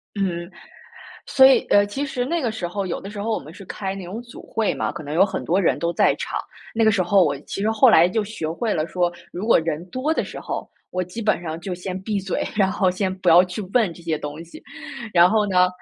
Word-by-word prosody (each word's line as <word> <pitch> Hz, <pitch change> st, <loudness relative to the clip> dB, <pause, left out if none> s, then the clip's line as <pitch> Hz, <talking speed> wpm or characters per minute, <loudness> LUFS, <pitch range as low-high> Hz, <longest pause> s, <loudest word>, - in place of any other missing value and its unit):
嗯， 180 Hz, -3 st, -2 dB, 0.8 s
所 265 Hz, -, +5 dB
以， 265 Hz, 0 st, +7 dB
呃， 205 Hz, -, +6 dB
其 270 Hz, +8 st, -3 dB
实 250 Hz, -2 st, -2 dB
那 335 Hz, +6 st, -1 dB
个 240 Hz, -6 st, -1 dB
时 185 Hz, -6 st, -4 dB
候 195 Hz, +2 st, -3 dB
有 175 Hz, -, -3 dB
的 195 Hz, -, -8 dB
时 205 Hz, -1 st, -7 dB
候 220 Hz, +3 st, -2 dB
我 -, -, 0 dB
们 150 Hz, -, -12 dB
是 195 Hz, +3 st, -12 dB
开 195 Hz, +1 st, -5 dB
那 195 Hz, -, -7 dB
种 200 Hz, +7 st, -6 dB
组 240 Hz, -1 st, -13 dB
会 220 Hz, -2 st, 0 dB
嘛， -, -, -2 dB
可 -, -, -7 dB
能 145 Hz, 0 st, -7 dB
有 175 Hz, +5 st, +4 dB
很 -, -, -4 dB
多 180 Hz, +4 st, +2 dB
人 180 Hz, -, +2 dB
都 170 Hz, 0 st, -1 dB
在 -, -, +3 dB
场。 -, -, -4 dB, 0.3 s
那 225 Hz, 0 st, +2 dB
个 220 Hz, -, +5 dB
时 200 Hz, -3 st, +2 dB
候 185 Hz, +1 st, +4 dB
我 145 Hz, -3 st, 0 dB
其 175 Hz, -, -6 dB
实 210 Hz, -, +1 dB
后 225 Hz, +3 st, +5 dB
来 170 Hz, -4 st, +6 dB
就 215 Hz, +4 st, 0 dB
学 200 Hz, -6 st, -5 dB
会 210 Hz, +7 st, -2 dB
了 155 Hz, -1 st, -1 dB
说， 175 Hz, 0 st, 0 dB, 0.2 s
如 180 Hz, -, -5 dB
果 230 Hz, -, +5 dB
人 160 Hz, 0 st, -2 dB
多 275 Hz, -, -1 dB
的 -, -, 0 dB
时 -, -, -8 dB
候， -, -, -5 dB, 0.2 s
我 185 Hz, -, -1 dB
基 180 Hz, +6 st, -7 dB
本 210 Hz, -5 st, +1 dB
上 160 Hz, -1 st, -5 dB
就 185 Hz, 0 st, -4 dB
先 185 Hz, +1 st, -5 dB
闭 205 Hz, +1 st, -2 dB
嘴， 190 Hz, -1 st, -2 dB
然 195 Hz, -3 st, +2 dB
后 190 Hz, 0 st, +1 dB
先 185 Hz, +1 st, -1 dB
不 185 Hz, -, -1 dB
要 170 Hz, +2 st, +8 dB
去 180 Hz, +3 st, -6 dB
问 225 Hz, -8 st, +3 dB
这 170 Hz, -, -14 dB
些 160 Hz, -2 st, 0 dB
东 150 Hz, +2 st, -6 dB
西， 170 Hz, -, -13 dB, 0.5 s
然 175 Hz, 0 st, +6 dB
后 215 Hz, +1 st, +2 dB
呢 180 Hz, -2 st, +4 dB
190 Hz, 285 characters per minute, -22 LUFS, 175-215 Hz, 0.8 s, 要